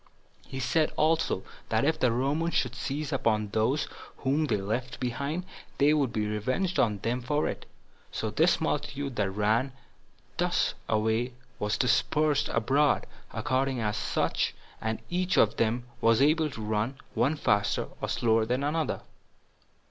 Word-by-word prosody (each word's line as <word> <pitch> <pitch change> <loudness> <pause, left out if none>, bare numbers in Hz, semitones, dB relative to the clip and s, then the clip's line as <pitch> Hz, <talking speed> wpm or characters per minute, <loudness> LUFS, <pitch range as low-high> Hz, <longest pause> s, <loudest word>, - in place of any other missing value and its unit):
He 135 - -6
said 150 +5 +2
also, 155 -10 +2 0.3
that - - +2
if - - +1
the 125 - +3
Romans 145 +8 0
should 125 -2 +1
seize 140 +5 -3
upon 110 -5 +1
those 110 +8 +1 0.3
whom 140 +4 +1
they 140 - +1
left 115 +5 -3
behind, 140 +8 -2 0.3
they 145 +2 +5
would 140 -5 +1
be 110 -1 -1
revenged 130 - -1
on 105 -3 +3
them 120 +2 0
for 145 +5 0
it. - - -5 0.4
So 110 - -2
this 160 +11 +3
multitude 145 -3 -2
that 100 -2 +1
run 110 +7 +1 0.6
thus - - +1 0.2
away 110 +3 +1 0.3
was 105 0 0
dispersed 145 +4 +2
abroad, 135 +6 +2 0.3
according 130 0 0
as 105 -2 -2 0.9
each 180 +1 +1
of 110 0 +4
them 115 +2 +1 0.2
was 115 -1 +4
able 155 +2 +4
to 120 -5 -8
run, 110 +5 -1 0.2
one 140 +5 +2
faster 105 -8 +1
or - - -2
slower 115 -1 +2
than 125 +4 0
another. 155 +2 -1
130 Hz, 145 wpm, -28 LUFS, 110-150 Hz, 0.9 s, they